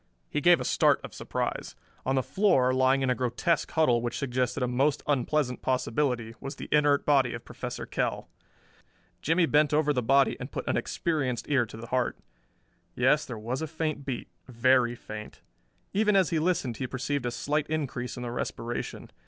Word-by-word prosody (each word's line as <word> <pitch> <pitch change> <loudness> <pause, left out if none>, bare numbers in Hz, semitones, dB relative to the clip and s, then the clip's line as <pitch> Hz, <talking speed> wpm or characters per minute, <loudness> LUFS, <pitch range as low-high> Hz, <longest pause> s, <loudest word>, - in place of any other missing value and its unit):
He - - 0
gave - - +6
a - - -4
start - - +3
of - - -8
surprise. - - -3 0.3
On 135 - +2
the 130 - +2
floor, 135 -11 +3
lying 130 +1 +3
in 130 - +2
a - - +4
grotesque 130 +7 0
huddle 125 -7 +3
which 120 0 -3
suggested 125 0 -1
a - - +1
most 135 +4 +1
unpleasant 140 -1 0
possibility, 125 -2 0
was 135 +1 -6
the - - -8
inert 145 -1 +3
body 135 -4 +3
of - - -9
Professor - - -6
Kell. - - -2 0.9
Jimmie 165 +3 +3
bent 150 -1 +3
over 150 -1 +3
the 125 - 0
body 135 +4 +3
and 125 +3 -7
put - - -5
an - - +1
experienced 135 -8 -1
ear 135 -5 +2
to 110 - -10
the 115 - -8
heart. 125 +1 -1 0.8
Yes, 130 +5 +3
there 115 -2 -6
as 130 - -1
a 160 - -2
faint 155 -2 -3
beat 130 -3 -4 0.2
very 125 0 +3
faint. 105 -2 -9 0.5
Even 210 0 +3
as 190 -4 +3
he 165 - +2
listened 155 -9 0
he 130 - -3
perceived 130 +1 -2
a - - +1
slight 145 +5 -1
increase 135 -6 -3
in 125 - -5
the 120 - -4
respiration. 120 0 -4
130 Hz, 185 wpm, -28 LUFS, 125-150 Hz, 0.9 s, gave